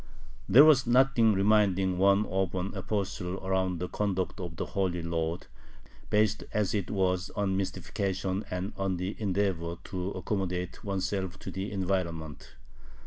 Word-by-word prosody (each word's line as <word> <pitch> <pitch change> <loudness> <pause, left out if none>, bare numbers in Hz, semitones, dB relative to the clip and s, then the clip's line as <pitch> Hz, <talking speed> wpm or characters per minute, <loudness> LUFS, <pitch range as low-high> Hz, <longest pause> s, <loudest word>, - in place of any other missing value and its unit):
There 135 +9 +9
was 135 -5 +5
nothing 120 -3 +4
reminding 95 -2 +3
one 100 +2 +4
of 95 -1 -1
an 90 +2 -2
apostle 95 -3 -3
about 95 -1 0
the 90 +2 -3
conduct 95 -1 -2
of 85 -3 -6
the - - -3
"Holy 90 -3 -1
Lord," 85 +1 -2 0.6
based 105 0 +2
as 105 -2 +1
it 100 -4 -1
was 95 -2 0
on 100 -2 0
mystification 95 0 -2
and 90 +2 -3
on 95 -2 -1
the 90 +3 -3
endeavor 95 -4 -1
to 90 0 -4
accommodate 90 -2 -3
oneself 95 -1 -2
to - - -7
the 95 +2 -4
environment. 85 -7 -3
95 Hz, 140 wpm, -29 LUFS, 90-100 Hz, 0.6 s, There